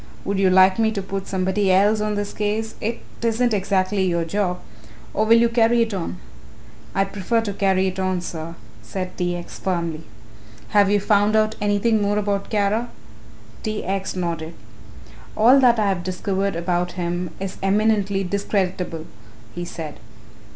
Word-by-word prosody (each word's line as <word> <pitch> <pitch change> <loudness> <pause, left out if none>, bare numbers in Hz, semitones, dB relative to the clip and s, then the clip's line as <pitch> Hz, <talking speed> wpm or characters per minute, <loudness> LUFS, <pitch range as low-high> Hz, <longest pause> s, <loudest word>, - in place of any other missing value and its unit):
Would 200 0 -1
you 190 -1 +4
like 185 +2 +5
me 220 -1 +3
to 200 - -2
put 195 0 -5
somebody 190 +1 +1
else 205 +3 +4
on 210 0 -1
this 205 0 -3
case 215 +1 -2
it 225 +2 -2 0.2
isn't 230 +1 +1
exactly 195 0 +1
your 170 -2 0
job 180 0 -1 0.5
or 215 - +1
will 230 +1 +7
you 235 0 +5
carry 230 0 +3
it 225 -2 -4
on?" 180 -1 -3 0.8
"I 195 - +3
prefer 205 +4 -1
to 205 -3 -3
carry 190 -1 +2
it 190 0 -2
on, 185 -1 0
sir," 165 -1 -6 0.3
said 185 -1 -5
T. 175 -1 -1
X. 175 - -9
firmly. 170 -4 -2 0.7
"Have 205 -1 +4
you 205 0 +3
found 205 +1 +2
out 215 0 +3
anything 205 +2 +2
more 205 0 +1
about 200 -1 -1
Kara?" 215 +3 0 0.7
T. 215 -1 -3
X. 190 0 -2
nodded. 170 -2 -3 0.8
"All 245 +6 +6
that 245 -3 +5
I 210 -2 +2
have 180 -3 -1
discovered 190 +1 -2
about 175 +1 -1
him 175 0 -2
is 195 -1 -5
eminently 200 0 +2
discreditable," 185 -4 -2 0.5
he 175 - -5
said. 160 -3 -7
195 Hz, 165 wpm, -22 LUFS, 185-210 Hz, 0.8 s, will